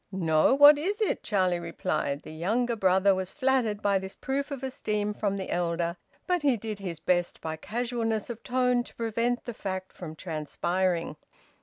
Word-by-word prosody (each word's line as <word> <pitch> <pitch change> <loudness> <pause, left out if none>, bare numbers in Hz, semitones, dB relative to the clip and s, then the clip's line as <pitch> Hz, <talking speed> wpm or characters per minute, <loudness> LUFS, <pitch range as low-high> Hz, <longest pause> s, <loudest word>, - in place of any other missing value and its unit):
"No, 165 +3 +3
what 290 +1 +8
is 400 +8 -1
it?" 430 - 0
Charlie 185 -4 +1
replied. 155 -4 -2
The - - -9
younger 225 +9 0
brother 190 -1 +4
was 190 -1 -3
flattered 255 -5 0
by 200 -1 +3
this 190 0 -8
proof 280 +2 -2
of 275 -2 -6
esteem 210 -5 -2
from 200 -1 -1
the 190 - -5
elder, 170 -1 0 0.3
but 360 -2 +1
he 275 -5 +3
did 215 -1 -5
his 175 -5 -5
best 175 +1 0
by 160 0 -4
casualness 225 +2 -2
of 230 -1 -8
tone 250 0 +1
to - - -14
prevent 230 +2 -1
the 240 - -4
fact 190 -2 -5
from 160 -3 -8
transpiring. 170 +1 -2
205 Hz, 175 wpm, -28 LUFS, 175-245 Hz, 0.3 s, what